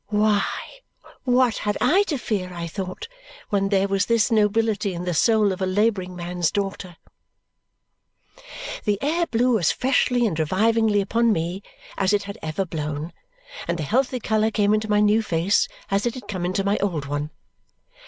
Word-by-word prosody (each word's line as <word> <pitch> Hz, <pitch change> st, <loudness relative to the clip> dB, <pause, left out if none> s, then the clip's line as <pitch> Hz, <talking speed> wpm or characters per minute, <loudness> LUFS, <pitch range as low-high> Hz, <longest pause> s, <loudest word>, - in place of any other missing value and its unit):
Why, 210 Hz, -1 st, +2 dB, 0.8 s
what 250 Hz, -2 st, +3 dB
had 210 Hz, -1 st, -1 dB
I 375 Hz, +5 st, +4 dB
to 295 Hz, -, -1 dB
fear, 195 Hz, -7 st, -3 dB
I 170 Hz, -1 st, -4 dB
thought, 185 Hz, -, -6 dB, 0.4 s
when 195 Hz, -1 st, +1 dB
there 195 Hz, -1 st, +2 dB
was 195 Hz, 0 st, 0 dB
this 230 Hz, -1 st, +2 dB
nobility 210 Hz, -2 st, +1 dB
in 175 Hz, +1 st, -5 dB
the 180 Hz, -, -1 dB
soul 215 Hz, +3 st, +3 dB
of 190 Hz, -, -5 dB
a 190 Hz, -, +1 dB
labouring 190 Hz, -2 st, 0 dB
man's 175 Hz, -1 st, -1 dB
daughter! 195 Hz, -3 st, -4 dB, 1.9 s
The 205 Hz, -2 st, +1 dB
air 330 Hz, +6 st, 0 dB
blew 240 Hz, 0 st, +2 dB
as 165 Hz, -, +3 dB
freshly 250 Hz, -2 st, +2 dB
and 170 Hz, -8 st, -1 dB
revivingly 210 Hz, +6 st, +2 dB
upon 230 Hz, +4 st, +2 dB
me 175 Hz, +1 st, -2 dB, 0.4 s
as 195 Hz, +1 st, +2 dB
it 205 Hz, 0 st, +2 dB
had 200 Hz, 0 st, -8 dB
ever 160 Hz, +5 st, -2 dB
blown, 155 Hz, -1 st, -4 dB, 0.5 s
and 170 Hz, -, -1 dB
the 160 Hz, -, -3 dB
healthy 255 Hz, -, 0 dB
colour 220 Hz, -1 st, +1 dB
came 210 Hz, -1 st, +2 dB
into 215 Hz, 0 st, 0 dB
my 210 Hz, 0 st, +3 dB
new 210 Hz, +2 st, +4 dB
face 180 Hz, -1 st, +1 dB, 0.2 s
as 200 Hz, +4 st, +1 dB
it 240 Hz, -, -2 dB
had 255 Hz, -, -9 dB
come 185 Hz, -3 st, -3 dB
into 185 Hz, +2 st, -1 dB
my 200 Hz, +1 st, +1 dB
old 170 Hz, -8 st, -1 dB
one. 145 Hz, +1 st, -3 dB
205 Hz, 175 wpm, -23 LUFS, 180-225 Hz, 1.9 s, I